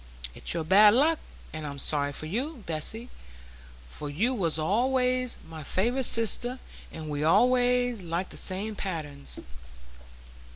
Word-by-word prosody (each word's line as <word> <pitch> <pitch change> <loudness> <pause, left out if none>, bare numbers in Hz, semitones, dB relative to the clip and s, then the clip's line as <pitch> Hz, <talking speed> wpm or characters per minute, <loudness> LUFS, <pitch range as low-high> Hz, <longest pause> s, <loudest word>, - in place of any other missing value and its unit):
It's - - -3
your 165 - -1
bad 205 +6 +7
luck, 310 +5 +3 0.3
and 155 0 -5
I'm 140 -1 -6
sorry 145 0 +1
for 150 - -5
you, 245 - -3
Bessy; 190 +10 -1 0.8
for 145 - -7
you 210 - +1
was 170 -9 0
allays 250 +8 +1
my 160 -1 -8
favourite 240 - 0
sister, 230 +3 +1 0.3
and 160 -1 -7
we 145 -1 -3
allays 245 +6 +3
liked 175 +1 -3
the - - -7
same 205 +4 -2
patterns." 155 -8 -5
200 Hz, 135 wpm, -28 LUFS, 155-245 Hz, 0.8 s, bad